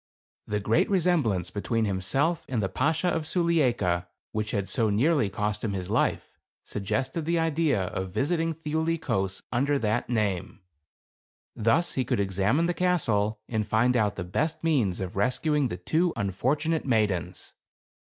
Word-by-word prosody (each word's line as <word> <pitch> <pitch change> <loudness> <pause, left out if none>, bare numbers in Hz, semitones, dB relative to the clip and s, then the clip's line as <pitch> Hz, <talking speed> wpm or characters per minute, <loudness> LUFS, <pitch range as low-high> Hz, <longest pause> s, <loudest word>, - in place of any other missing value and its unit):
The 105 - -1
great 105 +3 +2
resemblance 155 - +1
between 115 +2 -1
himself 135 - 0
and 125 -3 0
the - - +1
Bashaw 160 +6 +1
of 160 -2 -2
Sulieika, 125 - +1 0.2
which 105 0 -2
had 100 -2 -1
so 115 -3 +1
nearly 130 +2 +2
cost 105 +1 -2
him 105 -3 -1
his 95 -2 -4
life, - - 0 0.3
suggested 130 - -2
the 170 +1 +1
idea 160 - +1
of 95 +1 -4
visiting 165 - 0
Thiuli 160 +1 -1
Kos 95 - -2
under 140 +4 +1
that 110 -1 -1
name. 105 -5 -1 0.9
Thus 115 +11 +2
he 130 - 0
could 115 - -1
ex 95 -1 -2
amine 130 +13 +3
the 175 - +1
castle, 115 - +1
and 110 -3 -2
find 115 +4 +2
out 105 -3 +2
the 90 - -4
best 155 - -2
means 125 - +1
of 95 -1 -5
rescuing 135 +7 +1
the 90 - -5
two 160 - +1
unfortunate 135 - 0
maidens. 95 -7 0
115 Hz, 155 wpm, -27 LUFS, 100-160 Hz, 0.9 s, amine